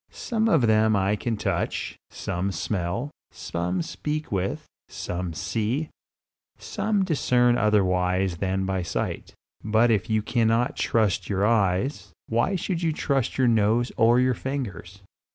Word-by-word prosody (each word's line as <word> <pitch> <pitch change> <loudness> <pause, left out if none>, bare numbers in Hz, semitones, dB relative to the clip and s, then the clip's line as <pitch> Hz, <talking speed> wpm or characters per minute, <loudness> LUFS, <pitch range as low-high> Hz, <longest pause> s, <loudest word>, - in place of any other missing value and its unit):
Some 225 -2 -1
of 160 -9 +4
them 110 -1 +4
I 100 +1 +2
can 115 +1 -2
touch, - - -2
some 90 +3 -3
smell, 100 +8 -2 0.2
some 85 +1 -3
speak 150 - -4
with, 95 -1 -2 0.2
some 90 0 -4
see, 110 - -2 0.7
some 205 -3 -1
discern 125 -7 +3
otherwise 95 -4 +1
than 95 +1 -1
by 95 -1 -1
sight. 85 - -4 0.3
But 110 +3 +3
if 105 -3 0
you 110 -1 +1
cannot 115 +1 +1
trust 110 -5 0
your 100 0 +1
eyes, 105 +4 0
why 120 - +1
should 180 -1 -2
you 165 -2 +1
trust 140 -4 -1
your 130 -2 +3
nose 115 +2 +2
or 115 +2 +4
your 130 0 +3
fingers? 110 -8 -5
110 Hz, 135 wpm, -25 LUFS, 95-125 Hz, 0.7 s, of